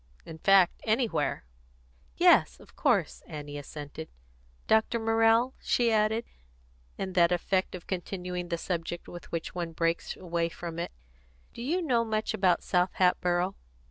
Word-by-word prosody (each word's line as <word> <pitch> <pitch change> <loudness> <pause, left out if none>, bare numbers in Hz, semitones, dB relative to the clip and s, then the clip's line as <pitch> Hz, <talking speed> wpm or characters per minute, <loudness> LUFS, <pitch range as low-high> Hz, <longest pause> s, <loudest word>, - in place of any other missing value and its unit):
In 160 0 -9
fact, 195 0 +4
anywhere." 220 - 0 0.7
"Yes, - - +5
of - - -18
course," - - +1
Annie 145 -1 -7
assented. 145 +2 -8 0.6
"Dr. 220 +1 +3
Morrell," 225 +2 +3
she 235 -2 +2
added, 220 +1 +2 0.7
in 190 -1 -4
that 175 -2 +4
effect 185 +2 0
of 180 - -9
continuing 180 -1 -4
the 170 - -1
subject 170 0 -4
with 175 - -10
which 165 -1 -4
one 170 -2 -4
breaks 165 +1 -1
away 170 -2 -1
from 170 0 -7
it, 170 - -3 0.6
"do - - -8
you 335 +9 0
know 245 -7 +2
much 220 -1 -1
about 190 -4 +2
South 180 0 +1
Hatboro'?" 180 0 +2
180 Hz, 140 wpm, -29 LUFS, 170-220 Hz, 0.7 s, Yes